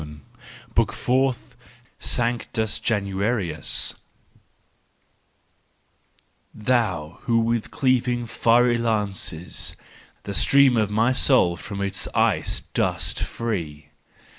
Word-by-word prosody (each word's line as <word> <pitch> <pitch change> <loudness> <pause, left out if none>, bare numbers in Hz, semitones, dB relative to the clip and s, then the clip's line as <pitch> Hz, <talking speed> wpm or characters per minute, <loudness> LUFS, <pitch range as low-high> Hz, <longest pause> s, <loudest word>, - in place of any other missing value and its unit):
14 75 -1 -10 0.5
BOOK - - +2
FOURTH 130 0 0 0.4
SANCTUS 115 -3 -1
JANUAR1US 100 -5 -1 2.6
Thou 105 -9 -1
who 120 -2 +2
with 115 0 -1
cleaving 125 -2 +1
fiery 120 +1 +3
lances 100 -7 -2 0.5
The 100 - -5
stream 140 +4 +5
of 110 -3 +1
my 110 +4 +2
soul 125 -10 +3
from 100 +3 -6
its 100 -1 -2
ice - - +1
dost - - 0
free. 80 -11 -4
110 Hz, 90 wpm, -23 LUFS, 95-120 Hz, 2.6 s, stream